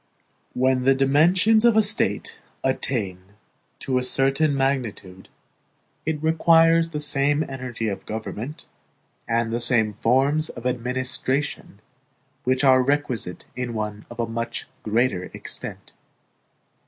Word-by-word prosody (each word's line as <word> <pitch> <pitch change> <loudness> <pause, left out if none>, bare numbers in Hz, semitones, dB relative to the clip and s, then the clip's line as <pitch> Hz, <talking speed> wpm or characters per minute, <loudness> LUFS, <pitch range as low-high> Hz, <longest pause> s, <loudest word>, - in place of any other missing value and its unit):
When 130 0 +2
the 135 +1 +4
dimensions 175 +11 +4
of 235 -2 +5
a - - +7
State 200 - +1 0.2
attain 110 -8 -1 0.6
to 130 -1 -1
a - - -3
certain 135 +3 +2
magnitude, 120 -9 -2 0.8
it 155 -1 -2
requires 165 +1 +4
the 150 -2 -4
same 145 0 +1
energy 125 -4 -4
of 100 - -5
government 110 +6 -6 0.6
and 115 0 0
the 120 - -1
same 110 -3 +2
forms 135 +9 +2
of 120 - -10
administration 125 -1 -2 0.6
which 130 +2 +1
are 130 -1 +6
requisite 130 -8 -2
in 125 -2 -4
one 105 -1 -5
of 120 -1 -3
much 115 0 -4 0.2
greater 110 -4 0
extent. - - -7
130 Hz, 115 wpm, -23 LUFS, 115-145 Hz, 0.8 s, a